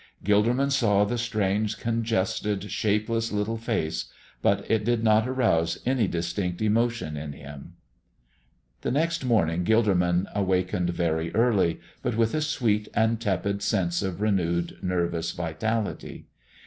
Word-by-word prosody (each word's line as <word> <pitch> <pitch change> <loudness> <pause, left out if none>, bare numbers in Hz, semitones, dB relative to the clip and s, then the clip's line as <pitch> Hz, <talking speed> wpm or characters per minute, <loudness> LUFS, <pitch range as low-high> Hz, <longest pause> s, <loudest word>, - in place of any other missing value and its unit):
Gilderman 120 +7 +3
saw 105 -7 +3
the 120 +3 -2
strange, 105 -2 0
congested, 105 -3 -1
shapeless 110 +3 0
little 105 +2 -1
face, 110 -9 -2 0.4
but 100 0 +2
it 110 -1 +1
did 120 0 +1
not 110 +1 +4
arouse 85 -11 +1
any 125 -4 +2
distinct 85 +1 -2
emotion 115 -5 0
in 75 0 -5
him. 70 0 -11 1.1
The - - -2
next 165 +3 0
morning 90 -9 +2
Gilderman 95 -4 +2
awakened 90 -3 0
very 85 -2 -1
early, 105 -7 +2 0.2
but 120 -2 -2
with 115 -1 +2
a 155 - 0
sweet 115 -8 0
and 110 0 +2
tepid 100 -1 -1
sense 95 -5 0
of 95 -1 -3
renewed 85 -5 0
nervous 85 -2 -1
vitality. 100 +7 -3
105 Hz, 130 wpm, -26 LUFS, 90-115 Hz, 1.1 s, not